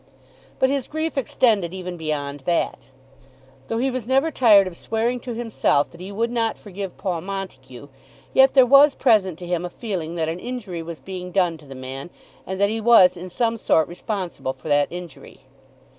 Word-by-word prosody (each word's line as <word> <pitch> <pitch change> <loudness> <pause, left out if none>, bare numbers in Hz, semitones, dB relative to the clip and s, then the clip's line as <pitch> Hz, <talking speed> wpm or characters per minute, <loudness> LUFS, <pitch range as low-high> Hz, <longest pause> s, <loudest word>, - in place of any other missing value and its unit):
But 260 0 +2
his 275 -2 -1
grief 315 +1 -3
extended 220 -8 +1
even 180 -1 -6
beyond 145 -3 -3
that. 170 -7 -1 0.8
Though 225 - -2
he 260 +3 0
was 250 -3 -4
never 270 +5 +2
tired 215 -8 +6
of 185 -2 -6
swearing 230 +6 -1
to 240 -1 -6
himself 225 -11 +1
that 170 - -13
he 190 +2 -7
would 230 +4 -1
not 230 -2 0
forgive 195 -2 -7
Paul 180 -4 -2
Montague, 160 -9 -7 0.5
yet 265 +1 +5
there 260 -2 +8
was 275 +3 +6
present 195 - +3
to 180 - -8
him 175 -1 -1
a 180 - -4
feeling 175 -6 -5
that 160 -2 -1
an 165 +2 -3
injury 215 -7 -5
was 165 -1 -8
being 185 -1 -7
done 180 -3 +2
to 150 - -16
the 135 - -9
man, 130 +4 -7 0.4
and 190 0 -4
that 200 0 +3
he 225 +1 -2
was 215 -6 +6
in 180 +1 -8
some 230 +4 0
sort 160 -7 +2
responsible 180 - -4
for 155 - -10
that 145 0 +3
injury. 175 -5 -10
190 Hz, 190 wpm, -22 LUFS, 170-235 Hz, 0.8 s, there